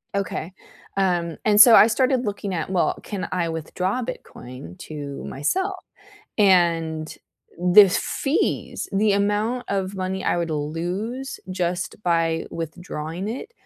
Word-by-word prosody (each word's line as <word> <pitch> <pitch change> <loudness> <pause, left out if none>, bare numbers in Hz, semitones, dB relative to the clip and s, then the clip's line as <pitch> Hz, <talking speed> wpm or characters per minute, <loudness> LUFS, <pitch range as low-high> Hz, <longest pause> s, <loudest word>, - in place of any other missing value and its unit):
Okay. 185 -2 -3 0.4
Um, 175 -4 0
and 210 0 +7
so, 235 -1 +10
I 220 - +8
started 255 +1 +1
looking 200 -1 -3
at, 165 +1 -3
well, 185 -2 +1
can 200 -3 -4
I 175 -2 0
withdraw 180 +8 -2
Bitcoin 125 - -9
to 145 -2 -7
myself, 370 - -2 0.6
and, 165 -5 +2 0.6
the 210 -1 +11
f 180 - -3
fees, 275 +3 -1
the 205 +1 +3
amount 210 +5 0
of 195 0 -2
money 190 0 -3
I - - +1
would 170 -1 -2
lose 180 - -3
just 180 0 -2
by 165 -2 +1
withdrawing 165 +2 -5
it, 430 - -6
185 Hz, 130 wpm, -23 LUFS, 165-210 Hz, 0.6 s, the